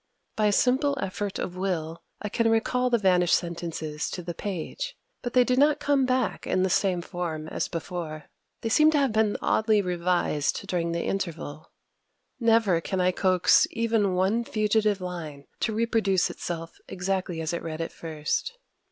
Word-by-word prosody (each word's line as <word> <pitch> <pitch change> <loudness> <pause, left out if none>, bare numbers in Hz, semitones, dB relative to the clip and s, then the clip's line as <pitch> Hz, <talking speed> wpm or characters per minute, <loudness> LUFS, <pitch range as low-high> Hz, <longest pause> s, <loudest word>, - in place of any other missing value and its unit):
By 215 -1 +2
a - - +3
simple 265 +6 +2
effort 195 0 -3
of 180 - -4
will, 170 -4 -2 0.2
I - - -1
can 230 +2 +1
recall 250 +3 +2
the 240 - +3
vanished 180 -4 +4
sentences 165 -3 -3
to 180 - -5
the 175 0 -4
page; 205 - -5 0.2
but 245 - -4
they 250 - +6
do 250 0 +1
not 290 +3 +4
come 280 -2 +2
back 255 -2 0
in 185 - +2
the 190 - +1
same 180 -2 +1
form 165 -4 -4
as - - -2
before: 165 -3 -5 0.4
they 225 - -2
seem 305 +7 +5
to - - +3
have 275 -4 +2
been 215 -1 +2
oddly 220 -1 +3
revised 175 -5 0
during 170 -2 -1
the 170 0 -1
interval. 165 -5 -4 0.7
Never 225 -7 +3
can 190 +2 -2
I 180 0 +3
coax 185 -1 +4
even 225 -4 +1
one 195 +6 +2
fugitive 215 -2 +1
line 160 -6 -6
to 225 - 0
reproduce 220 -4 +1
itself 165 -1 -6
exactly 185 -2 -2
as 160 +1 -2
it 170 - -2
read 160 -1 -5
at 165 - -3
first. 160 - -3
190 Hz, 170 wpm, -26 LUFS, 170-225 Hz, 0.7 s, they